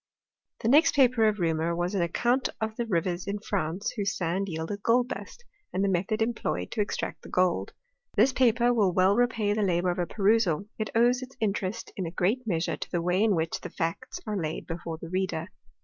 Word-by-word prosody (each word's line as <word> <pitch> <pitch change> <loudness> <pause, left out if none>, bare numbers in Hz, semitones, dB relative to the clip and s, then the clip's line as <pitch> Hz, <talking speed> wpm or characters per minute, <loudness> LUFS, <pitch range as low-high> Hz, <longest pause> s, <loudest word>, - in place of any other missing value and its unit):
The - - -1
next 295 +7 +5
paper 250 -5 +5
of 210 -1 +1
Reaumur 165 -1 0
was 175 +3 -1
an 195 - +1
account 240 +10 +1
of 220 0 -2
the 235 0 -3
rivers 175 -1 -1
in 200 +1 -1
France 195 -3 -2
whose 210 0 -2
sand 185 +3 -1
yielded 165 +5 -4
gold 245 +3 +3
dust, 485 - -8 0.3
and 190 - 0
the - - +2
method 195 +5 +1
employed 220 - -2
to - - 0
extract 205 - -3
the - - -12
gold. 185 -1 +1 0.4
This 265 - +4
paper 245 -1 +3
will 205 -6 +3
well 185 +2 +4
repay 230 -4 +2
the 215 - 0
labour 180 -2 +2
of 175 - -4
a 175 - 0
perusal; 205 -4 +2
it 215 -2 -2
owes 245 +2 +4
its 255 +1 -10
interest 205 -1 -2
in 190 -6 -3
a - - -3
great 215 +8 0
measure 165 -4 0
to - - -6
the 175 - -1
way 180 +3 +1
in 215 -3 +3
which 165 0 -2
the - - -6
facts 165 0 -4
arc 210 -2 -2
laid 155 -1 -4
before 165 -1 -5
the 165 - -8
reader. 185 -2 -2
195 Hz, 210 wpm, -28 LUFS, 175-225 Hz, 0.4 s, next